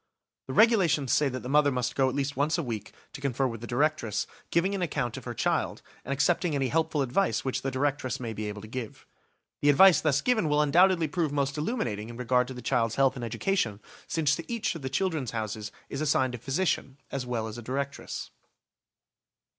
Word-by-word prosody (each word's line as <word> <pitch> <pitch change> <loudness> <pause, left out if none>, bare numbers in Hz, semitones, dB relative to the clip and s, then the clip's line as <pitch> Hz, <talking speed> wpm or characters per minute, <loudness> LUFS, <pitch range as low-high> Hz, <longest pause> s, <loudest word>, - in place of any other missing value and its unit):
The 130 - -4
regulations 175 - +4
say 145 -2 +3
that 130 -1 -5
the - - -5
mother 145 +1 +4
must 125 -1 -1
go 135 -1 +3
at 130 - -4
least 140 0 -1
once 150 +5 +1
a 170 - -1
week, 110 -5 -5 0.2
to 135 - -8
confer 135 -1 0
with 115 -3 -3
the 120 - -6
directress, 120 -4 0 0.2
giving 180 +4 +2
an 195 - -2
account 140 -8 -1
of - - -8
her - - -5
child, - - -1 0.2
and - - -6
accepting 160 +3 +1
any 135 -2 0
helpful 155 -2 +1
advice 130 - 0
which 130 - -1
the 135 - -1
directress 130 -1 -1
may 115 -3 -4
be 110 0 -4
able 105 0 -6
to - - -8
give. 120 -1 -7 0.6
The 145 - +4
advice 185 +5 +7
thus 150 -4 +2
given 220 -10 +2
will 150 0 +3
undoubtedly 170 +3 +4
prove 160 -1 -1
most 140 -1 0
illuminating 125 - -2
in 120 - -8
regard 125 0 +2
to 130 - -7
the 125 - -8
child's 115 -2 +1
health 135 -1 +3
and 125 - -6
education, 115 - -1 0.3
since 155 -3 +1
to 165 - -8
each 230 -2 -1
of 165 - -7
the 130 - -3
"Children's 155 -4 -1
Houses" 110 0 -4 0.2
is 140 - -5
assigned 130 -4 +2
a 125 - -5
physician 135 0 -1
as 135 -2 -3
well 115 -3 -2
as 110 +2 -7
a - - -7
directress. 140 +4 -4
135 Hz, 215 wpm, -28 LUFS, 125-155 Hz, 0.6 s, advice